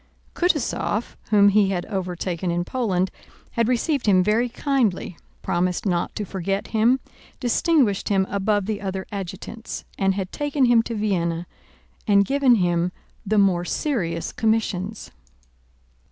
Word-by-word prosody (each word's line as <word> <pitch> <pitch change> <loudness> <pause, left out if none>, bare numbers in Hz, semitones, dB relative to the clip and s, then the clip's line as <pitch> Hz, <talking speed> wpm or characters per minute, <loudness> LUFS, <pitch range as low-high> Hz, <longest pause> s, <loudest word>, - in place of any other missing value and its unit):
Kutúzov, 300 - 0
whom 205 -2 +6
he 200 -1 +4
had 180 -2 -2
overtaken 180 -3 -3
in 175 +1 -1
Poland, 190 -7 0 0.4
had 230 -1 +1
received 255 +1 0
him 185 -3 +5
very 225 +5 +2
kindly, 235 - 0 0.3
promised 180 +2 0
not 175 -3 -1
to 210 - -3
forget 195 +1 -3
him, 235 +4 +3 0.4
distinguished 245 - +2
him 195 -2 +3
above 200 0 0
the 210 -1 -3
other 190 -1 -3
adjutants, 200 +3 -6
and 195 -1 +2
had 190 -1 -3
taken 290 -2 +1
him 240 -2 +5
to 230 0 -5
Vienna 175 -5 -1 0.6
and 200 -1 +5
given 270 +1 +4
him 175 -3 +1 0.4
the 215 +2 +2
more 190 -4 +3
serious 175 - -2
commissions. 220 -2 -1
200 Hz, 135 wpm, -23 LUFS, 185-230 Hz, 0.6 s, whom